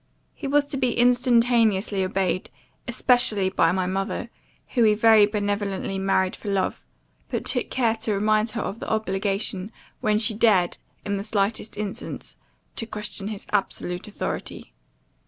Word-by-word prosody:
He 285 - -6
was 290 +1 +3
to 280 - -4
be 255 -3 0
instantaneously 235 -5 +3
obeyed, 185 -1 -1 0.4
especially 240 -5 +3
by 165 -3 +3
my 185 0 0
mother, 195 +5 -3 0.4
whom 240 -4 +3
he 210 -1 +4
very 220 -1 +6
benevolently 205 -2 -2
married 190 -1 +1
for 210 - -7
love; 195 -1 -1 0.5
but - - -3
took - - 0
care 235 -4 +1
to 220 -1 -1
remind 215 +2 +2
her 230 - -1
of 215 - -5
the - - -6
obligation, 195 -1 -1 0.3
when 210 -1 +2
she 220 0 +2
dared, 205 -5 +3 0.3
in 200 -1 -1
the 195 - -4
slightest 210 0 -1
instance, 210 -2 -6 0.4
to 225 - -3
question 210 -2 -3
his 210 -2 -6
absolute 180 -2 -2
authority. 210 - -5
210 Hz, 150 wpm, -24 LUFS, 195-230 Hz, 0.5 s, very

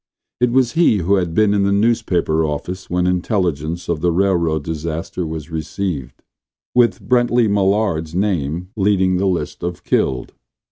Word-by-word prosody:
It 125 0 +3
was 125 -1 +3
he 165 -9 +3
who 100 +2 +2
had 85 -3 -2
been 105 -1 +3
in 100 - +2
the 100 0 +2
newspaper 100 -7 +1
office 85 +5 -4
when 90 0 0
intelligence 90 -3 -1
of 85 -3 -2
the 90 0 +2
railroad 85 -4 +1
disaster 80 +2 -4
was 80 0 -6
received, 80 -3 -4 0.5
with 120 -1 +2
Brently 120 -1 +3
Mallard's 95 -5 +1
name 90 -3 -1
leading 95 -3 +2
the 95 +2 +1
list 90 -3 -2
of 85 -2 -4
"killed." 65 -2 0
90 Hz, 150 wpm, -19 LUFS, 80-100 Hz, 0.5 s, It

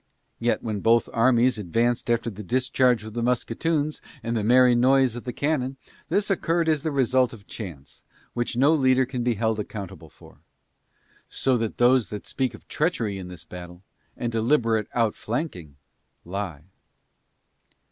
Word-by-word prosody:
Yet, 120 +1 0
when 110 -3 -2
both 115 +3 +3
armies 120 0 +3
advanced 115 +6 0
after 115 0 +1
the 105 +1 -8
discharge 125 +1 +1
of 110 -1 -9
the 120 - -2
musketoons 145 +6 -1 0.2
and 115 +1 -2
the 110 - 0
merry 125 +2 +5
noise 130 0 +3
of 120 - -7
the 125 - -3
cannon, 135 -1 -1 0.3
this 205 0 +1
occurred 170 -3 +1
as 155 -3 +2
the 160 - -1
result 130 -3 +2
of 105 -3 -13
chance, 80 -13 -9 0.3
which 120 0 -2
no 140 +5 +5
leader 130 -3 +3
can 125 -1 -4
be 120 -1 +1
held 110 0 0
accountable 95 -6 -7
for; - - -18 0.9
so 130 -1 +1
that 115 -2 -3
those 125 -1 +4
that 105 -1 -7
speak 130 -2 -2
of - - -17
treachery 115 - -1
in 90 - -7
this 90 -2 -9
battle, 90 +1 -10 0.3
and 120 - -2
deliberate 115 -2 +1
outflanking, 110 - -2 0.5
lie. 90 -5 -5
120 Hz, 155 wpm, -25 LUFS, 105-130 Hz, 0.9 s, merry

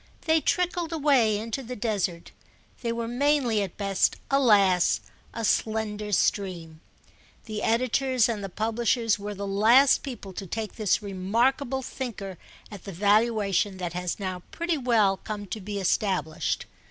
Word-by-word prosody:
They 320 -1 +2
trickled 350 +1 0
away 275 -9 +3
into 225 +5 -4
the 250 0 -7
desert—they 205 +2 -4
were 230 0 -3
mainly 250 -3 +1
at 195 -4 -5
best, 195 -2 +1 0.2
alas, 205 -10 +4 0.3
a 230 - -3
slender 215 -1 -1
stream. 170 -5 -1 0.6
The 215 -1 -5
editors 255 +2 +2
and 220 -4 -3
the 195 - -4
publishers 225 +2 0
were 205 +1 -5
the 200 +1 -5
last 225 +8 +5
people 220 -8 -7
to 195 - -6
take 220 +3 -4
this 215 -1 +1
remarkable 240 +8 0
thinker 215 - -6 0.3
at 205 -3 -10
the 200 - -6
valuation 205 0 +2
that 175 -2 -4
has 180 +1 -3
now 185 -2 -4
pretty 340 0 -1
well 220 -6 +3
come 210 0 -6
to 210 +2 -6
be 200 +1 -4
established. 175 -4 -1
215 Hz, 140 wpm, -26 LUFS, 195-240 Hz, 0.6 s, last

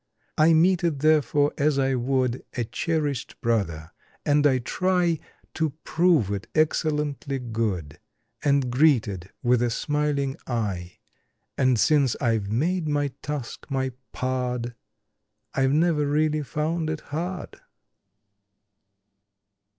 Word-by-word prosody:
I 160 +1 +5
meet 180 +2 +4
it, 165 -4 +1
therefore, 145 -1 +3
as 145 0 +2
I 135 -1 +2
would 130 0 0
A 120 - +1
cherished 145 +3 -2
brother, 85 -9 -1 0.3
and 145 0 +4
I 130 -2 +3
try 175 +5 +1 0.3
To 160 -3 -1
prove 165 - +2
it 100 +1 -4
excellently 150 -3 0
good, 110 - -3 0.4
And 140 -3 +2
greet 135 -3 +4
it 95 -2 -7
with 120 0 +3
a 120 - +2
smiling 145 +1 -1
eye 100 -7 -3 0.3
— - - -50
And 130 -3 +2
since 140 -4 +3
I've 110 -5 0
made 165 +8 0
my 145 -1 +1
task 150 -5 -5
my 130 -1 -1 0.2
pard 125 -2 -2 0.8
I've 135 0 +2
never 155 -1 +2
really 155 +1 +1
found 155 +4 -2
it 155 -1 -3
hard. 175 +4 -4
140 Hz, 120 wpm, -25 LUFS, 120-155 Hz, 0.8 s, I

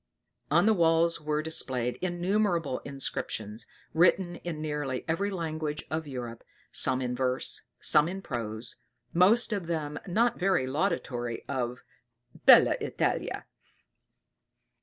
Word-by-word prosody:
On 170 +5 +4
the 220 - +5
walls 165 -2 +3
were 150 0 -1
displayed 130 -6 0
innumerable 175 -4 0
inscriptions, 110 -5 -4 0.3
written 175 +1 +3
in 170 -3 -5
nearly 150 -4 -3
every 165 +5 0
language 155 -5 -3
of 160 -1 -2
Europe, 120 -4 -6 0.3
some 130 - +2
in 125 0 -2
verse, 130 0 -1 0.2
some 150 +1 +4
in 190 +2 -5
prose, 115 -3 -4 0.4
most 215 +7 +4
of 195 -5 -3
them 150 -3 -3
not 230 +6 +2
very 185 -7 +2
laudatory 130 -6 -2
of 125 -2 -3 0.6
"bella - - +8
Italia." - - -1
155 Hz, 115 wpm, -29 LUFS, 130-175 Hz, 0.6 s, bella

